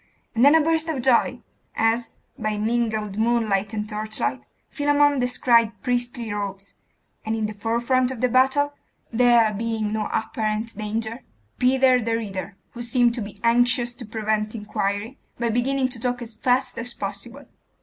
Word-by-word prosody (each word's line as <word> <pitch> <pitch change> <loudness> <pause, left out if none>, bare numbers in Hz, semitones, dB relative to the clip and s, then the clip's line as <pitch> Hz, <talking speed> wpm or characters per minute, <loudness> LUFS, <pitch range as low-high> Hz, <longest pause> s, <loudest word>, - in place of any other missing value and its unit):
and 230 - +2
then 285 +3 +7
a 320 - +6
burst 325 +1 +1
of 305 -5 -1
joy, 255 -2 +3 0.4
as, 225 +1 0 0.2
by 215 -1 -2
mingled 220 -2 -1
moonlight 220 -3 +1
and 210 -1 -3
torchlight, 215 0 -2 0.3
Philammon 290 -1 +2
descried 235 -3 +2
priestly 245 -3 -2
robes, 200 -1 -5 0.5
and 220 +1 -1
in 220 -1 -1
the 210 - -4
forefront 235 +4 +1
of 260 -3 -6
the 250 - +3
battle 265 +4 +3 0.4
there 235 -2 +4
being 220 0 -2
no 215 -1 -1
apparent 220 +1 -2
danger 220 +3 -3 0.4
Peter 255 0 +4
the 225 0 0
Reader, 195 -3 -5 0.2
who 240 - -8
seemed 240 0 +3
to 240 - -4
be 205 -1 -8
anxious 240 +1 +3
to 240 0 -10
prevent 215 0 -2
inquiry, 210 +3 -3 0.2
by 235 0 0
beginning 260 +3 +1
to 245 -2 -6
talk 245 +1 -1
as 230 -1 -7
fast 250 +4 0
as 235 +1 -5
possible. 220 +8 -6
230 Hz, 160 wpm, -23 LUFS, 215-250 Hz, 0.5 s, then